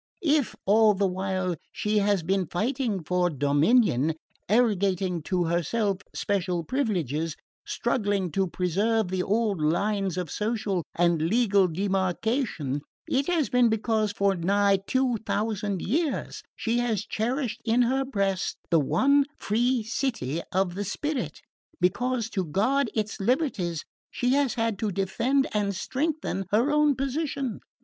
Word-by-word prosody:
If, 295 -4 +2
all 215 +1 +5
the 200 +1 +1
while, 185 -1 -1 0.2
she 210 0 0
has 200 -3 +1
been 190 +1 0
fighting 220 - -1
for 180 +2 +1
dominion, 150 - +2 0.3
arrogating 195 -6 +2
to 180 -2 +1
herself 185 +4 0 0.2
special 185 -4 -1
privileges, 165 - -1 0.3
struggling 200 -6 0
to 195 +2 +1
preserve 195 +5 0
the 185 0 -1
old 205 -2 0
lines 195 +4 0
of 180 -4 -3
social 210 -4 -1
and 170 -2 +2
legal 200 +1 +3
demarcation, 190 - -1 0.3
it 275 +1 0
has 335 -5 +1
been 250 -2 +4
because 220 -1 0
for 200 -1 +1
nigh 200 +3 +2
two 260 -2 +1
thousand 205 -2 -2
years 300 - -1
she 235 +1 0
has 225 -4 -1
cherished 240 +1 -2
in 235 +2 +3
her 265 +3 +1
breast 200 -8 -1
the 165 - +5
one 280 - +3
free 240 +3 +1
city 210 - -2
of 185 -1 +1
the 200 +3 -3
spirit, 250 - -3 0.4
because 230 +6 +1
to 190 - -1
guard 220 - +1
its 215 0 -2
liberties 195 - 0 0.2
she 245 - -1
has 275 -2 +2
had 225 -4 -1
to 215 -2 -1
defend 230 +9 +1
and 205 -2 0
strengthen 270 - -2
her 235 +8 +3
own 300 -1 +3
position. 275 -3 -2
205 Hz, 135 wpm, -26 LUFS, 185-245 Hz, 0.4 s, all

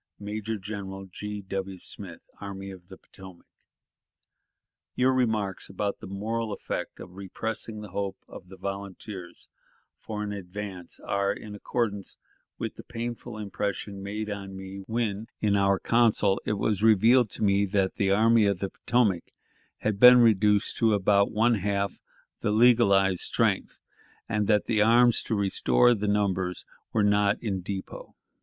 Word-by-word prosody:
"Major 105 +2 -4
General 95 -1 -6
G. 105 +2 -7
W. 95 0 -4
Smith, - - -7 0.2
Army 100 -1 -7
of 90 -2 -13
the 95 0 -12
Potomac. 95 -3 -14 0.8
"... - - -58
Your 130 +1 +3
remarks 110 -6 -1
about 100 +1 -3
the - - -9
moral 110 +3 -3
effect 100 - -5
of 90 - -10
repressing 110 +3 -5
the 105 - -9
hope 100 0 -3
of 90 - -11
the 95 - -12
volunteers 100 -1 -7 0.5
for 105 -1 -5
an 105 - -4
advance 95 -2 -7
are 100 0 0
in 105 - -7
accordance 105 -1 -3 0.4
with - - -5
the - - -9
painful 120 0 -6
impression 100 -1 -4
made 105 +2 -4
on 100 -2 -6
me 95 0 -8
when, 110 -2 -2
in 105 -1 +2
our 100 -1 +3
council, 110 -4 +3
it - - +1
was 105 -1 -1
revealed 110 +2 +5
to - - -3
me 100 0 +3
that 95 -1 0
the 100 - +1
Army 110 +2 +4
of 100 -2 +1
the 95 +1 -4
Potomac 110 -8 +1 0.6
had 105 -2 -1
been 125 +1 +10
reduced 105 -2 +3
to 110 -2 +3
about 100 0 +3
one 115 +1 +2
half 100 0 -1 0.4
the - - -1
legalized 105 -5 +4
strength, - - 0 0.5
and 105 -1 0
that 105 -2 +3
the 110 -3 +1
arms 120 +2 +5
to 110 - -2
restore 100 - +3
the 105 -2 -2
numbers 95 -3 0 0.3
were 110 - +2
not 100 0 +3
in 95 -4 -2
depot. 95 +1 -7
100 Hz, 155 wpm, -27 LUFS, 95-110 Hz, 0.8 s, been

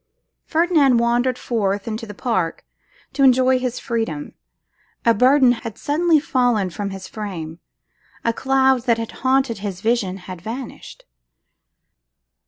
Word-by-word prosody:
Ferdinand 315 -6 +3
wandered 240 +2 +1
forth 205 -5 -2
into 225 0 -4
the 210 - -9
park 190 -9 -2 0.5
to 280 - -2
enjoy 260 -1 +5
his 250 -1 -3
freedom. 225 -11 -3 0.7
A 230 - +5
burden 255 +3 +5
had 230 -2 -5
suddenly 315 +4 +2
fallen 245 - +1
from 200 +2 -4
his 190 -1 -8
frame; 175 -7 -6 0.7
a 230 - +2
cloud 265 -1 +2
that 235 -1 +3
had 230 -1 -5
haunted 260 -4 +1
his 195 -3 -5
vision 220 -5 0
had 185 -2 -8
vanished. 255 - -8
235 Hz, 130 wpm, -21 LUFS, 205-260 Hz, 0.7 s, enjoy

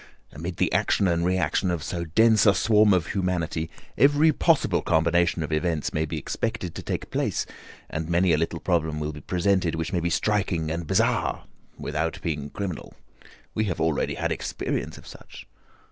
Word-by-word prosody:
Amid 85 +4 -6
the - - +1
action 100 - +2
and 85 -1 +1
reaction 95 +1 +1
of 85 -4 -2
so 85 0 -3
dense 110 +5 +4
a 100 - +6
swarm 105 +2 +4
of 90 -3 +1
humanity, 85 -4 -1 0.3
every 145 +5 +5
possible - - +2
combination 85 +1 +2
of 75 - -5
events 80 -1 -1
may 80 +1 0
be 80 +1 -4
expected 95 +3 -3
to - - -6
take - - -4
place, - - -1 0.4
and 80 +1 -4
many 85 0 +3
a - - +3
little 80 0 -2
problem 80 -4 0
will 75 0 -3
be 75 - -9
presented 90 0 +1
which 80 +3 -3
may 90 - +2
be 85 +1 -1
striking 95 -5 0
and 85 0 -4
bizarre - - +1 0.3
without 80 +2 -2
being 75 -3 -3
criminal. 90 -1 -6 0.6
We 110 - 0
have 90 -5 -3
already 80 -2 0
had - - -2
experience - - -3
of - - -14
such." - - -12
85 Hz, 175 wpm, -25 LUFS, 80-95 Hz, 0.6 s, a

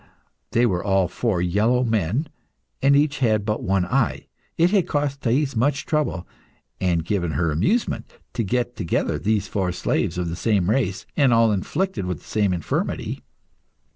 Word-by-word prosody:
They 120 +1 +3
were 90 -6 0
all 95 -2 +2
four 95 -2 -1
yellow 110 +8 +2
men, 115 - 0 0.5
and 140 +1 +5
each 145 0 +2
had 110 -5 +2
but 105 0 -1
one 95 -1 +1
eye. 125 +3 0 0.3
It 170 +2 +4
had 200 -4 +2
cost 145 -2 -1
Thais 135 +3 +1
much 135 +5 +1
trouble, 150 - -1 0.5
and 85 -3 0
given 85 -4 -1
her 85 -2 +1
amusement, 180 - 0 0.2
to - - -1
get 120 +4 -1
together 85 -6 -1
these 105 -1 0
four 95 -3 -1
slaves 90 -1 -1
of 90 -1 -1
the 80 - -3
same 100 -1 +1
race, 105 -7 0
and 140 -4 +4
all 115 -1 +4
afflicted 150 - -2
with 90 -3 -2
the - - -19
same 105 -3 +1
infirmity. 85 -4 -2
110 Hz, 170 wpm, -23 LUFS, 90-135 Hz, 0.5 s, and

